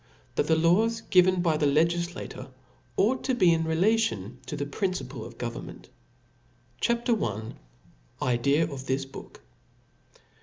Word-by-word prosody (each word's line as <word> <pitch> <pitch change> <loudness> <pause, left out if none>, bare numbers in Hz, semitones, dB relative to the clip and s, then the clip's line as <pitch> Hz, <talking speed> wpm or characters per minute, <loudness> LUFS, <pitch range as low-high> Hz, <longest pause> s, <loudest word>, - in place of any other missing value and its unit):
T^hat - - +1
the 160 - +4
Laws 215 +8 +2
givm 185 -1 +5
by 160 -3 +2
the 150 - +2
LegiJIator 170 +4 -1 0.5
ought 250 +6 +2
to 260 - 0
he 175 -8 +5
relative 160 - 0
to 140 - -4
the 145 - -2
Principle 185 +6 -3
^ - - -8
oj - - -19
Government. - - -7 0.9
C 235 - +4
H 235 +1 -4
A 240 - +4
P. 210 - -2
L 110 +1 -4 0.7
Idea 130 +5 +2
of 140 -4 -5
this 135 +1 0
Book. 135 - -12
165 Hz, 150 wpm, -27 LUFS, 140-195 Hz, 0.9 s, givm